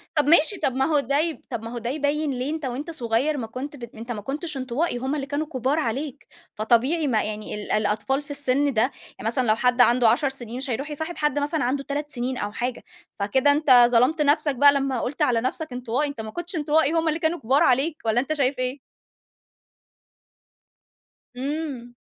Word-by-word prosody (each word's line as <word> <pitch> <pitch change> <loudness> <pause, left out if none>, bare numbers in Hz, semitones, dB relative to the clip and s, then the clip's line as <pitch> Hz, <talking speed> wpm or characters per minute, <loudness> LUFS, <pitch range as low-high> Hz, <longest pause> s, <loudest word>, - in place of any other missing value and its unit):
طَب 295 - +3
ماشي، 335 +5 +4
طَب 265 - 0
ما 265 0 +2
هو 300 -1 +2
ده 280 +1 0
يب 320 0 -1
طَب 235 -3 -4
ما 230 - -6
هو - - -4
ده 235 0 -3
يبين 290 +1 0
ليه 255 +2 -3
أنت 315 -3 -4
وأنت 270 +6 -4
صغير 265 +1 0
ما 230 - -4
كنت 260 +6 -6
بت 235 -4 -10
أنت 230 +2 -7
ما 215 -3 -4
كنتش 290 - -4
انطوائي 260 +3 -1
هُم 265 +4 -2
اللي 280 -2 -3
كانوا 290 +2 -3
كبار 270 +1 0
عليك، 275 +1 -3 0.3
فطبيعي 245 +9 +2
ما 225 -5 +1
يعني 215 0 -5
ال 210 - -6
الأطفال 215 +6 0
في 290 0 -10
السن 280 0 +1
ده، 220 - +2
يعني 250 -3 -4
مثلًا 245 +2 +1
لو 215 - +4
حد 250 +1 +2
عنده 240 -1 +5
10 265 +5 +2
سنين 245 -3 -5
مش 265 +1 -4
هيرُوح 275 +5 -3
يصاحب 315 +4 -5
حد 295 -1 +1
مثلًا 290 +1 -1
عنده 275 +3 -1
3 290 +1 -4
سنين 250 -1 -3
أو 205 - -3
حاجة، 245 +2 -4 0.4
فكده 260 +8 +3
أنت 275 -5 +6
ظلمت 250 +7 +3
نفسك 295 -1 +2
بقى 285 +3 +6
لمّا 275 -3 0
قُلت 275 +3 -4
على 235 -2 +3
نفسك 255 +3 -3
انطوائي، 250 +4 -1
أنت 280 -6 -6
ما 220 0 -7
كنتش 345 +1 -3
انطوائي، 310 0 +2
هُم 330 0 +1
اللي 315 +1 0
كانوا 330 +1 0
كبار 260 +5 +3
عليك، 275 +5 +2
والّا 225 +1 +2
أنت 275 +5 -1
شايف 275 -3 0
إيه؟ 255 +2 -2 2.6
إمم. 270 -3 -4
270 Hz, 210 wpm, -24 LUFS, 240-295 Hz, 2.6 s, أنت